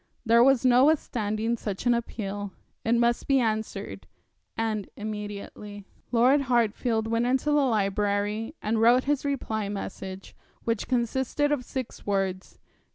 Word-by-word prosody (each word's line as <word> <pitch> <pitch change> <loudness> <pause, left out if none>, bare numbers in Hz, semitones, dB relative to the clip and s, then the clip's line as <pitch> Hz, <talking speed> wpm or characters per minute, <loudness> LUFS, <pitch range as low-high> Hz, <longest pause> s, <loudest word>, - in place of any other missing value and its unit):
There 235 +1 +6
was 270 -1 +4
no 250 +1 +6
withstanding 230 -6 0
such 205 0 -5
an 245 - +5
appeal. 205 -4 -4 0.3
It 230 +1 +2
must 235 0 +1
be 275 -1 +4
answered, 220 -2 -3 0.5
and 220 -3 -2
immediately. 210 -1 -7 0.3
Lord 255 +4 +4
Hartfield 230 -1 +1
went 230 +1 +1
into 265 +4 +1
the 295 0 +4
library 210 - 0
and 220 +1 0
wrote 240 +3 +5
his 290 -1 0
reply 220 -7 -2
message, 195 -1 -7 0.3
which 230 -2 -1
consisted 265 +4 0
of 285 -4 0
six 255 -1 -6
words. 195 -2 -2
225 Hz, 135 wpm, -27 LUFS, 205-250 Hz, 0.5 s, There